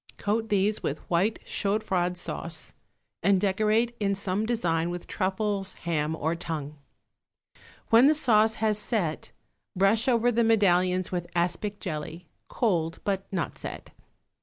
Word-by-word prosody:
Coat 220 Hz, +2 st, -1 dB
these 205 Hz, +1 st, +1 dB
with 150 Hz, -, -4 dB
white 190 Hz, +6 st, +2 dB
chaud 205 Hz, +2 st, 0 dB
froid 180 Hz, -1 st, 0 dB
sauce 165 Hz, -2 st, -4 dB, 0.5 s
and 195 Hz, +2 st, +3 dB
decorate 215 Hz, +4 st, +1 dB
in 200 Hz, -2 st, +1 dB
some 200 Hz, +2 st, -1 dB
design 170 Hz, -8 st, 0 dB
with 175 Hz, 0 st, -5 dB
truffles, 195 Hz, 0 st, -2 dB
ham 160 Hz, -2 st, -2 dB
or 160 Hz, +1 st, -1 dB
tongue. 155 Hz, -3 st, -5 dB, 1.1 s
When 230 Hz, +4 st, +7 dB
the 310 Hz, -, +4 dB
sauce 220 Hz, -6 st, +4 dB
has 215 Hz, -2 st, +1 dB
set, 195 Hz, -9 st, -2 dB, 0.4 s
brush 195 Hz, +5 st, +3 dB
over 245 Hz, -1 st, +3 dB
the 235 Hz, 0 st, +2 dB
medallions 185 Hz, -4 st, +2 dB
with 175 Hz, -1 st, -3 dB
aspic 190 Hz, +4 st, -1 dB
jelly, 160 Hz, 0 st, -5 dB, 0.2 s
cold 170 Hz, -8 st, 0 dB
but 195 Hz, -1 st, -2 dB
not 185 Hz, -4 st, -3 dB
set. -, -, -7 dB
195 Hz, 135 wpm, -27 LUFS, 175-215 Hz, 1.1 s, When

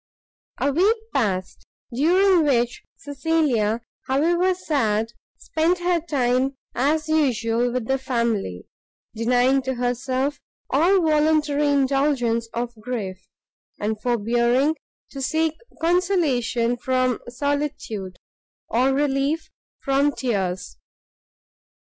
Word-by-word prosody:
A 280 Hz, -, +1 dB
week 390 Hz, -, +3 dB, 0.2 s
passed, 190 Hz, -8 st, -1 dB, 0.3 s
during 355 Hz, +6 st, +4 dB
which 245 Hz, -4 st, +1 dB, 0.2 s
Cecilia, 275 Hz, -7 st, 0 dB, 0.3 s
however 345 Hz, +7 st, +2 dB
sad, 225 Hz, -, 0 dB, 0.2 s
spent 325 Hz, +3 st, 0 dB
her 350 Hz, -1 st, +1 dB
time 265 Hz, -3 st, 0 dB, 0.2 s
as 300 Hz, +5 st, +1 dB
usual 245 Hz, -6 st, +1 dB
with 250 Hz, -2 st, -2 dB
the 270 Hz, +3 st, 0 dB
family, 230 Hz, -, -2 dB, 0.5 s
denying 245 Hz, +4 st, +2 dB
to 260 Hz, 0 st, -3 dB
herself 255 Hz, +3 st, -1 dB, 0.3 s
all 345 Hz, +7 st, +4 dB
voluntary 305 Hz, -1 st, +2 dB
indulgence 270 Hz, -4 st, +1 dB
of 240 Hz, 0 st, -3 dB
grief, 200 Hz, -6 st, -5 dB, 0.5 s
and 215 Hz, +1 st, -2 dB
forbearing 240 Hz, +5 st, +2 dB, 0.4 s
to 275 Hz, -, -7 dB
seek 315 Hz, +3 st, +1 dB, 0.3 s
consolation 305 Hz, -10 st, +1 dB
from 255 Hz, -1 st, 0 dB
solitude, 245 Hz, -8 st, -3 dB, 0.5 s
or 255 Hz, +4 st, +2 dB
relief 285 Hz, +2 st, 0 dB, 0.3 s
from 280 Hz, +1 st, +2 dB
tears. 190 Hz, -8 st, -2 dB
265 Hz, 95 wpm, -23 LUFS, 235-305 Hz, 0.5 s, during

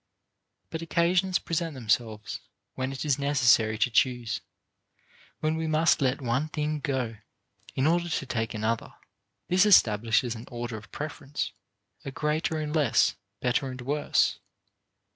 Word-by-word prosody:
But 160 Hz, -, -4 dB
occasions 175 Hz, +2 st, +2 dB
present 165 Hz, -2 st, -2 dB
themselves 110 Hz, -2 st, -1 dB, 0.3 s
when 130 Hz, 0 st, -3 dB
it 135 Hz, +2 st, -5 dB
is 145 Hz, -2 st, +1 dB
necessary 125 Hz, -6 st, +3 dB
to 120 Hz, +3 st, +1 dB
choose, 120 Hz, -3 st, +1 dB, 1.0 s
when 155 Hz, +1 st, +1 dB
we 160 Hz, 0 st, -2 dB
must 155 Hz, 0 st, +3 dB
let 135 Hz, +1 st, +1 dB
one 125 Hz, +5 st, 0 dB
thing 150 Hz, 0 st, -2 dB
go 130 Hz, -7 st, -2 dB, 0.6 s
in 130 Hz, -, +1 dB
order 170 Hz, +2 st, +2 dB
to 145 Hz, -, -1 dB
take 115 Hz, -4 st, -2 dB
another. 110 Hz, +1 st, -2 dB, 0.5 s
This 180 Hz, +1 st, +4 dB
establishes 115 Hz, -, +4 dB
an 115 Hz, 0 st, -9 dB
order 120 Hz, -1 st, -5 dB
of 110 Hz, +1 st, -10 dB
preference, 145 Hz, -1 st, -4 dB, 0.5 s
a -, -, -5 dB
greater 155 Hz, +3 st, -1 dB
and 150 Hz, 0 st, -3 dB
less, 145 Hz, -7 st, +3 dB, 0.3 s
better 125 Hz, +2 st, +1 dB
and 130 Hz, 0 st, -7 dB
worse. 145 Hz, +4 st, +1 dB
135 Hz, 140 wpm, -27 LUFS, 120-155 Hz, 1.0 s, This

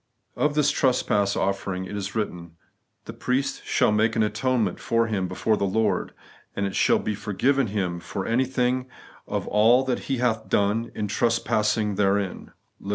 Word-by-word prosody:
Of 150 Hz, 0 st, 0 dB
this 150 Hz, -1 st, +3 dB
trespass 105 Hz, -6 st, +1 dB
offering 95 Hz, -1 st, -2 dB
it 105 Hz, -, -7 dB
is 100 Hz, +1 st, -4 dB
written, 85 Hz, -6 st, -4 dB, 0.2 s
' -, -, -49 dB
The -, -, -7 dB
priest 130 Hz, +2 st, -2 dB
shall -, -, +2 dB
make 110 Hz, +1 st, +2 dB
an 110 Hz, -, +3 dB
atonement 110 Hz, -2 st, 0 dB
for 115 Hz, 0 st, +1 dB
him 100 Hz, -5 st, -1 dB
before 110 Hz, +4 st, 0 dB
the 100 Hz, -, 0 dB
Lord, 110 Hz, +3 st, 0 dB, 0.4 s
and 100 Hz, -, -1 dB
it 95 Hz, -, -3 dB
shall -, -, +4 dB
be 105 Hz, -, -2 dB
forgiven 115 Hz, +6 st, 0 dB
him 95 Hz, -4 st, -2 dB
for 95 Hz, +2 st, -5 dB
anything 125 Hz, +1 st, 0 dB, 0.4 s
of -, -, -3 dB
all 115 Hz, +5 st, +4 dB
that 130 Hz, -2 st, -2 dB
he 135 Hz, -, +1 dB
hath 115 Hz, -3 st, -1 dB
done 105 Hz, +4 st, +1 dB
in 105 Hz, -, -2 dB
tres 115 Hz, +3 st, +1 dB
passing 105 Hz, -2 st, 0 dB
therein* 100 Hz, -2 st, 0 dB, 0.3 s
(Lev. 100 Hz, -, -9 dB
110 Hz, 175 wpm, -25 LUFS, 100-125 Hz, 0.4 s, shall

